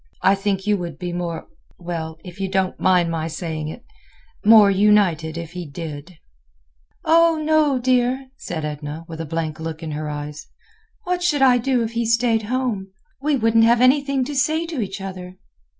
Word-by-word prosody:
I 190 - +5
think 195 -1 -1
you 210 -1 +2
would 175 -3 -6
be 175 -1 -5
more—well, 170 -1 -6
if 180 +1 -11
you 195 -1 -2
don't 190 -1 -1
mind 180 -2 +3
my 160 -1 -2
saying 160 -2 -4
it—more 400 - +2
united, 190 -6 +3
if 165 -1 -6
he 180 -2 -6
did." 155 +2 -7 0.9
"Oh! 310 -3 +3
dear 250 0 +2
no!" 265 - -17
said 160 -10 -5
Edna, 150 +2 -6
with 165 -1 -7
a 165 - -6
blank 160 0 -3
look 160 0 -6
in 160 - -4
her 150 0 -4
eyes. 150 0 -6 0.6
"What 360 -1 -1
should 300 -6 +2
I 250 -2 +5
do 250 -1 +1
if 225 - -3
he 230 0 -1
stayed 230 -1 +2
home? 245 -7 -1 0.3
We 295 0 +1
wouldn't 225 -2 +3
have 235 +1 +4
anything 270 +1 +3
to 290 - -5
say 310 +4 +1
to 325 -7 -4
each 195 -1 -5
other." 185 -1 -7
195 Hz, 175 wpm, -21 LUFS, 165-255 Hz, 0.9 s, I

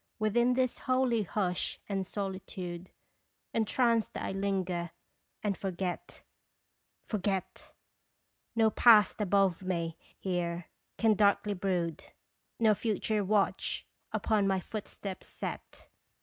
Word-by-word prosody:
Within 240 +3 +3
this 255 -1 +1
holy 255 -3 +3
hush 185 -2 -1
and 195 -2 -2
solitude 185 -3 -5 0.6
Entranced 230 0 +2
1 195 0 -3
linger, 185 -3 -1 0.5
and 205 -2 +1
forget 185 -2 -4 0.8
forget; 195 -3 -2 0.8
No 220 -1 +4
Past 215 -3 +6
above 195 -3 +3
me 170 -3 -2 0.2
here 175 -2 -2 0.3
can 225 -1 +4
darkly 205 0 +3
brood, 180 -4 -1 0.5
Nor 220 -2 +5
Future 215 0 0
watch 200 0 +1 0.3
upon 210 -3 +2
my 190 -1 +2
footsteps 195 -1 -6
set. - - -7
195 Hz, 100 wpm, -31 LUFS, 185-215 Hz, 0.8 s, Past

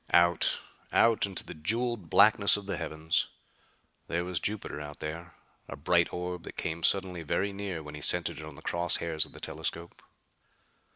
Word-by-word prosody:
Out 85 -1 +4 0.3
out 110 -3 +4
into 95 -2 -2
the - - -7
jeweled 115 +3 -2
blackness 100 0 +6
of 100 - -8
the 100 -1 -2
heavens. 80 -1 -1 0.8
There 85 +1 -1
was 90 -2 -1
Jupiter 100 -6 -3
out 75 0 -8
there, 80 +2 -6 0.3
a - - -6
bright 85 +4 +2
orb 90 0 -4
that - - -10
came 80 +1 -3
suddenly 90 -1 +1
very 100 +5 0
near 100 -5 -4
when 75 0 -9
he 75 - -7
centered 85 +3 +3
it - - -7
on 75 -2 -9
the - - -13
cross 85 0 +1
hairs 80 -2 +1
of - - -18
the - - -11
telescope. 85 +1 -5
85 Hz, 180 wpm, -30 LUFS, 80-100 Hz, 0.8 s, blackness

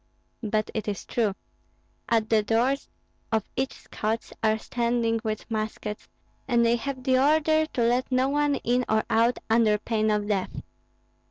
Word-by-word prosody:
"But 215 -1 -1
it 220 - -3
is 200 -4 -3
true. 215 -5 0 0.7
At 225 -2 +2
the 220 -1 +3
doors 235 +6 +1 0.4
of 220 -2 +2
each 265 +1 -1
Scots 220 +1 -4
are 220 0 +3
standing 235 0 0
with 215 -2 -3
muskets, 215 -1 -4 0.4
and 240 -2 +3
they 230 +1 +4
have 260 +1 -5
the 255 0 +3
order 310 +2 +3
to 250 - -3
let 245 +3 +1
no 255 +1 +3
one 290 0 +2
in 245 +2 +2
or 220 0 +3
out 230 +2 +3
under 225 -2 +4
pain 215 0 0
of 210 -1 0
death." 195 -3 -2
230 Hz, 160 wpm, -26 LUFS, 215-255 Hz, 0.7 s, they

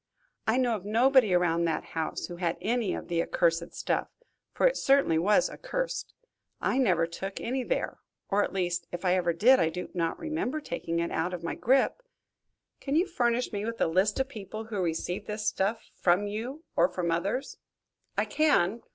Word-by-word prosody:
"I 220 +3 +3
know 245 -3 +2
of 195 - -6
nobody 235 +2 +4
around 170 -1 +2
that 160 -2 -1
house 160 -1 -2
who 175 - -8
had 170 -2 -1
any 230 -2 0
of - - -7
the 170 -1 +1
accursed 170 0 +1
stuff, - - -1 0.4
for - - +1
it - - +1
certainly 270 -13 +3
was 210 +9 +4
accursed. - - -4 0.4
I 265 - +1
never 180 -10 +3
took 195 +4 -6
any 255 +3 -2
there - - -2 0.3
or, 205 +1 +2
at - - -3
least, 175 -2 -1
if 175 +2 -5
I 180 - +4
ever 175 -2 +2
did, 240 +11 +5
I 160 - +3
do 180 +2 -6
not 165 -2 -1
remember 310 -2 -2
taking 170 - -4
it 170 0 -1
out 175 +3 -1
of 170 - -9
my 165 - -2
grip." 265 - +2 0.8
"Can 280 +1 -2
you 340 +4 +4
furnish 245 - 0
me 205 0 -2
with 230 +1 -4
a - - +3
list 190 +8 +2
of 265 - +1
people 215 -4 -7
who 215 -3 -3
received 180 +3 -2
this 210 0 -4
stuff 210 +4 -1
from 180 +3 +2
you 235 +9 -5
or 175 +2 +4
from 175 -3 -2
others?" 200 +11 -2 0.6
"I - - +2
can. 235 - +2
200 Hz, 195 wpm, -28 LUFS, 175-250 Hz, 0.8 s, did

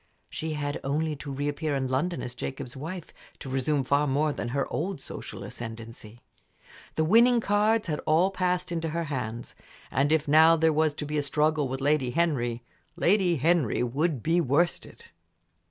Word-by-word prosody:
She 160 0 -3
had 145 -1 -3
only 150 +3 -1
to 145 0 -7
reappear 145 +2 -2
in 135 -1 -1
London 155 +7 -1
as 120 - -6
Jacob's 130 0 -6
wife 165 +5 -7 0.2
to - - -9
resume 135 +2 0
far 140 +3 +2
more 145 +2 +1
than - - -4
her 135 +3 -1
old 185 +2 -2
social - - -8
ascendency. 115 0 -9 0.7
The 160 - +2
winning 235 +8 +5
cards 215 +1 +2
had 150 -3 -2
all 170 +5 +4
passed 180 -2 -1
into 165 -1 -2
her 170 +2 -2
hands, 120 -2 -4 0.4
and 140 +4 +1
if 160 -2 +2
now 160 +3 +7
there 160 0 +3
was 155 -1 +2
to 150 - -5
be 150 0 -1
a - - +1
struggle 150 +1 +1
with 130 +1 -4
Lady 145 -2 +2
Henry, 120 -6 0 0.3
Lady 185 -2 +3
Henry 155 -5 +2
would 135 +2 -1
be 170 +2 +2
worsted. 170 - 0
150 Hz, 170 wpm, -27 LUFS, 135-170 Hz, 0.7 s, now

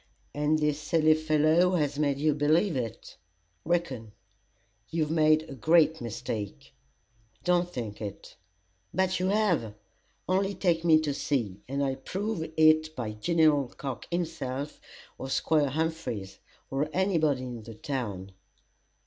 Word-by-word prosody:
"And 150 +1 +1
this 150 -1 0
silly 155 0 +3
fellow 155 +3 +3
has 145 -3 0
made 140 -2 +1
you 150 +1 +2
believe 155 +5 +2
it?" 115 -5 -5 0.5
"Reckon!" 135 -11 -2 0.8
"You've 160 -2 -1
made 155 -1 +4
a 140 - -8
great 160 +4 +3
mistake." 110 -3 -5 0.7
"Don't 175 +1 +2
think 115 -9 -6
it." 100 -2 -7 0.6
"But 190 0 +1
you 185 - 0
have: 185 - +1 0.5
Only 195 +2 +1
take 170 -3 +1
me 160 -2 +6
to 150 -2 -1
C, 115 -9 -2
and 140 +1 -1
I'll 135 -1 -1
prove 195 +7 -3 0.2
it 155 0 +4
by 115 -6 -3
General 150 +4 +2
Cocke, 135 -4 -5
himself, 155 -5 -3 0.4
or 135 - -5
Squire 150 +1 +2
Humphries, 155 -10 -3 0.3
or 140 +3 0
any 190 0 +1
body 145 -5 +1
in 120 -2 -6
the 115 0 -10
town." 105 -7 -4
155 Hz, 135 wpm, -28 LUFS, 130-165 Hz, 0.8 s, me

